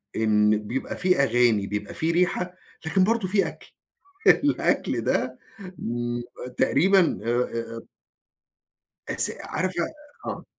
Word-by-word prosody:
إن 105 -1 +3
بيبقى 130 +2 -4
في 180 -4 +2
أغاني، 115 -5 +3
بيبقى 105 0 -4
في 160 +1 +1
ريحة، 180 +1 0 0.3
لكن 185 +4 +2
برضه 225 0 +1
في 195 +1 +2
أكل. - - -12 0.6
الأكل 290 0 +3
ده، - - -1 0.4
امم، 120 +1 -3 0.4
تقريبًا 185 +3 +3
آآ، 115 - -1 0.4
آآ 115 - -7 1.3
اس - - +3
عارفة 185 -2 -2 0.4
آه. - - -5
140 Hz, 115 wpm, -25 LUFS, 115-185 Hz, 1.3 s, إن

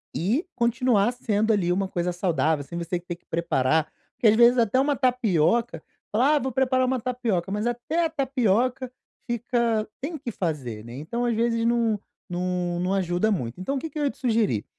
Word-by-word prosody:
e 230 - 0
continuar 235 -2 +2
sendo 220 -3 0
ali 185 -4 +1
uma 195 +2 0
coisa 180 -1 -2
saudável, 160 -4 0
sem 170 +5 -8
você 175 +1 -2
ter 175 -1 -7
preparar, 160 -2 +1 0.2
porque 230 - +2
às 215 - +6
vezes 240 +2 +6
até 230 +3 +3
uma 285 +1 +2
tapioca, 235 - +1 0.3
fala 260 +8 +3
"ah, - - +3
vou 265 -1 -3
preparar 260 +1 +2
uma 255 0 0
tapioca," 225 -8 -1
mas 210 +2 -1
até 245 +8 0
a - - 0
tapioca 255 -3 0 0.4
fica 235 -2 0
tem 305 +5 -4
que 255 -4 -5
fazer 140 - -4
né, 120 - -9
então 160 - -3
às 235 -1 +1
vezes 230 0 +1
não 230 -2 +2 0.3
não 180 -1 -2
não 180 +2 0
ajuda 185 +2 +1
muito. 125 - -3
Então 270 +10 -2
o - - -1
que 320 - -5
que 310 - -9
eu - - 0
ia 280 - +1
te - - -23
sugerir, 220 - +1
225 Hz, 195 wpm, -25 LUFS, 175-250 Hz, 0.4 s, às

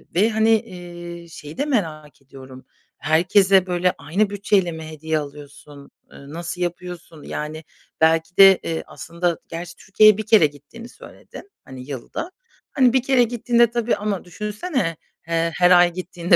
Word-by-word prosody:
ve, 210 +5 +3
hani, 220 0 +1
eee, 175 -4 -10
şeyi 150 -1 -11
de 285 - -1
merak 155 - -3
ediyorum: 130 -1 -14 0.3
Herkese, 190 +4 +3
böyle, 180 0 0
aynı 190 +9 -1
bütçeyle 200 -3 0
mi 160 -1 -8
hediye 160 0 -3
alıyorsun, 145 0 -11 0.2
ııı, 140 +2 -13
nasıl 170 +1 -6
yapıyorsun? 175 -2 -6
Yani, 155 +1 -6 0.4
belki 165 +2 +2
de, 195 -1 +8
eee, 165 -1 -3
aslında 170 0 -3
gerçi 170 +1 -7
Türkiye'ye 215 +1 +4
1 215 - -4
kere 215 -8 +5
gittiğini 145 - -14
söyledin, 400 - -14
hani, 130 -1 -10
yılda. 140 - -6 0.4
Hani, 255 -3 +3
1 260 - +3
kere 260 -2 +3
gittiğinde, 235 0 +2
tabii, 235 0 0
ama 205 -2 -3
düşünsene, 210 - -3 0.3
eee, 165 0 0
her 180 0 +4
ay 175 -1 +6
gittiğinde 175 -1 0
175 Hz, 150 wpm, -21 LUFS, 160-210 Hz, 0.4 s, de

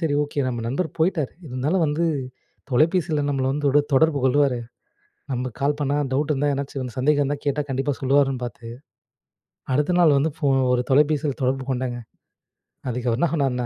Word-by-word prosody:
சரி 160 -4 0
ஓகே! 145 0 -3
நம்ம 120 -2 -3
நண்பர் 160 +7 -1
போயிட்டார், 160 -5 +1 0.2
இருந்தாலும் 140 +9 0
வந்து 150 +3 0 0.7
தொலைபேசியில 155 +2 +2
நம்மள 135 -2 0
வந்து 145 +2 -3
தொட 145 +2 +4
தொடர்பு 155 +1 +4
கொள்ளுவாரு. 135 -1 +3 0.7
நம்ம 125 0 -2
கால் 145 +1 +1
பண்ணா, 145 0 0 0.2
டவுட் 145 +3 0
இருந்தா 145 +1 0
ஏதாச்சும் 135 -3 -4
சந்தேகம் 145 +3 +2
இருந்தா 145 +1 -1
கேட்டா 145 +1 +1
கண்டிப்பா 135 +2 -1
சொல்லுவாருன்னு 135 -1 +2
பார்த்து, 120 -1 -9 1.1
அடுத்த 150 +5 +1
நாள் 155 -5 +5
வந்து 155 +3 +1
ஃபோன் 140 -4 +2
ஒரு 125 - +2
தொலைபேசியில 145 0 +2
தொடர்பு 130 +1 0
கொண்டேங்க. 125 -1 -2 0.9
அதுக்கு 125 0 -3
அவரு 115 - 0
என்ன 170 - +3
சொன்னார்னா, 130 -5 0
140 Hz, 165 wpm, -23 LUFS, 130-150 Hz, 1.1 s, நாள்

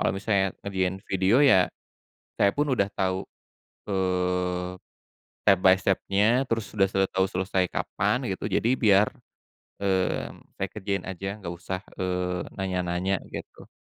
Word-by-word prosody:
Kalau - - +2
misalnya 95 -1 +1
ngerjain 95 -2 -1
video 95 +7 +3
ya, 95 -10 +6 0.7
saya 100 - +4
pun 145 +7 0
udah 100 -4 +2
tahu, 95 -1 -1 0.7
eee, 90 -1 0 0.8
step 100 -2 +6
by 95 0 +8
step-nya, 100 +6 +2
terus 115 -3 0
udah, 95 - +5
eee, 95 -1 +1
tahu 95 0 +3
selesai 95 0 0
kapan - - -1
gitu - - -4
jadi 115 - +2
biar, 105 -4 +4 0.7
eee, 95 -2 0 0.2
saya 95 - -2
kerjain 100 -2 -3
aja, 95 +2 -4
nggak 85 -4 -6
usah, 90 +2 -5 0.2
eee, 90 -1 -1
nanya-nanya, 90 0 -1
gitu. - - -9
95 Hz, 135 wpm, -26 LUFS, 90-100 Hz, 0.8 s, by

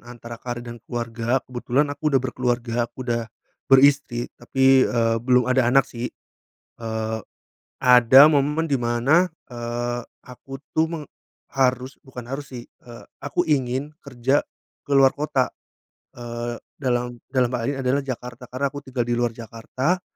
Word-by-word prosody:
antara 120 -1 -10
karir 120 -1 -5
dan 120 -1 -9
keluarga, 120 +1 -2
kebetulan 130 +3 -1
aku 150 +1 -1
udah 135 -3 +3
berkeluarga, 120 -2 -1
aku 130 +1 -9
udah 120 -1 -1 0.5
beristri 135 -3 +4
tapi, 130 +2 +4
eee, 115 -1 +1
belum 125 0 +3
ada 125 -1 +2
anak 135 +2 +5
sih. 120 +1 -5 0.7
Eee, 110 0 -2 0.6
ada 125 +1 +7
momen 150 +2 +1
di 140 - +2
mana, 120 +8 +3 0.2
eee, 120 0 -4 0.2
aku 135 +2 -11 0.2
tuh 160 - +5
meng 160 -2 -6 0.4
harus, 130 0 0
bukan 125 -3 -10
harus 140 +1 -6
sih, 120 -1 -8 0.2
eee, 120 -1 -12 0.2
aku 165 +4 -1
ingin 135 0 0 0.2
kerja 135 +1 0 0.4
keluar 135 -1 +4
kota. 140 -3 0 0.7
Eee, 120 0 -5 0.2
dalam 120 -2 -1
dalam 130 -2 +1
hal 125 - -1
ini 140 - -2
adalah 135 +2 +1
Jakarta, 125 -1 -7
karena 135 +2 -2
aku 145 - -6
tinggal 130 -3 -3
di 120 - -1
luar 120 0 +1
Jakarta. 120 - -3
125 Hz, 145 wpm, -23 LUFS, 120-135 Hz, 0.7 s, ada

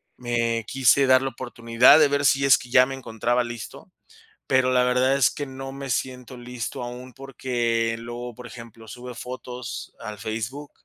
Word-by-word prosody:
Me 115 -2 -1
quise 135 +2 +3
dar 130 0 +5
la 135 - -1
oportunidad 120 +2 +4
de 155 - +6
ver 145 0 0
si 140 0 +3
es 135 - +7
que 125 - -11
ya 125 +1 +6
me 135 +1 -5
encontraba 120 -1 -1
listo, 120 -2 -9 0.5
pero 130 -1 +2
la 125 -1 +3
verdad 125 +2 +2
es 135 - +4
que 145 - -5
no 135 0 -7
me 135 0 -7
siento 125 0 -3
listo 125 +1 -6
aún 125 +1 -8
porque 120 -3 -2
luego, 120 +1 -7
por 125 - -11
ejemplo, 115 -2 -12
sube 125 +3 -9
fotos 125 0 -7
al 105 -1 -8
Facebook 115 +8 -5
125 Hz, 175 wpm, -24 LUFS, 120-130 Hz, 0.5 s, es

